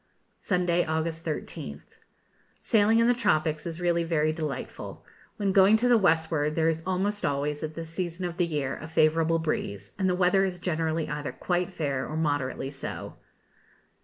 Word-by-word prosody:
Sunday, 175 -2 +1
August 160 +1 -2
13th. 75 - -6 0.6
Sailing 220 +1 +3
in 230 - +4
the 245 - +5
tropics 155 -9 +1
is 165 0 -5
really 170 -1 +1
very 155 -2 +1
delightful! 155 -4 -5 0.3
When 200 -2 +1
going 195 +3 +6
to 245 +3 +1
the 245 - +6
westward, 160 -4 +2
there 160 -1 +2
is 160 0 -1
almost 200 +3 -1
always, 145 +1 -1
at 155 0 -4
this 165 -1 -6
season 175 0 -3
of 175 -1 -4
the 175 -1 +2
year, 145 -5 -2
a 155 - -7
favourable 160 +1 +3
breeze, 100 -11 -3
and 190 -1 +2
the 180 - +2
weather 185 +1 +3
is 185 -2 -1
generally 160 -2 -1
either 150 -1 -3
quite 180 +1 -1
fair 140 -6 -2
or 155 - -3
moderately 145 -3 -1
so. 140 - -7
165 Hz, 170 wpm, -27 LUFS, 155-180 Hz, 0.6 s, going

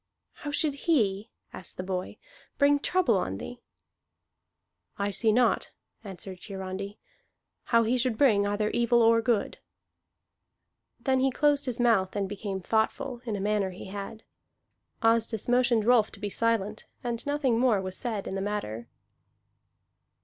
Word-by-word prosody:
"How 295 - -4
should 290 0 +1
he," 220 - 0 0.2
asked 185 - -8
the 185 - -3
boy, 185 -1 -4 0.4
"bring 285 0 +4
trouble 290 - +2
on 95 - -3
thee?" 245 - -8 1.4
"I 200 0 -1
see 220 +3 +2
not," 245 +2 +2 0.3
answered 190 -2 -8
Hiarandi, 195 +1 -6 0.7
"how 230 -1 +4
he 245 +3 +1
should 245 -3 0
bring 210 -7 +4
either 210 +1 0
evil 235 0 +3
or 230 0 +5
good." 225 -3 0 1.4
Then 265 -1 +1
he 265 +1 +3
closed 290 +1 +2
his 245 -1 -2
mouth 220 -6 +2
and 200 -1 -1
became 195 -1 -4
thoughtful, 235 +5 -1
in 220 -3 -2
a - - -3
manner 205 -1 0
he 185 +1 -9
had. 200 +2 -7 0.8
Asdis 225 -1 +2
motioned 245 -3 +3
Rolf 235 -3 +4
to - - -10
be 205 - -3
silent, 220 -2 -1 0.2
and 235 -1 -3
nothing 280 -5 +1
more 240 -5 +3
was 185 -1 -4
said 220 -4 -3
in - - -5
the 195 - -2
matter. 155 - -4
220 Hz, 150 wpm, -28 LUFS, 200-245 Hz, 1.4 s, or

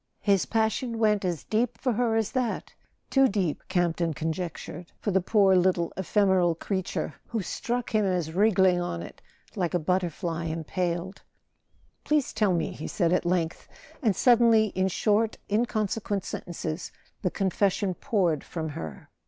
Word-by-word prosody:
His 200 -3 +3
passion 225 +2 0
went 210 -2 +2
as 175 -4 -2
deep 225 +2 0
for 255 -3 0
her 230 0 +1
as 225 -2 0
that—too 260 +2 -1
deep, 190 - -1
Campton 170 -2 0
conjec¬ 165 +2 -2
tured, 175 +1 -9
for 205 - -1
the 190 0 +3
poor 195 0 +4
little 180 -2 +2
ephemeral 190 -3 +2
creature, 190 +2 -3
who 225 -4 -2
struck 240 +6 -3
him 215 -1 +3
as 180 -5 -1
wriggling 190 -2 +4
on 85 - -3
it - - -11 0.3
like 180 -3 -1
a - - +3
butterfly 170 -1 -1
impaled. 170 +3 -3 0.8
"Please 300 -3 +1
tell 205 -5 +2
me," 165 - -1
he - - -6
said 170 -3 +1
at 180 - +1
length; 170 -2 -1 0.3
and 220 -8 +2
suddenly, 230 -3 +5
in 185 +1 +1
short 215 +3 +1
inconsequent 210 -3 0
sentences, 165 -1 -5 0.3
the 180 - +1
confession 195 +1 0
poured 180 - 0
from 160 -2 -4
her. 80 - -7
190 Hz, 150 wpm, -27 LUFS, 175-215 Hz, 0.8 s, suddenly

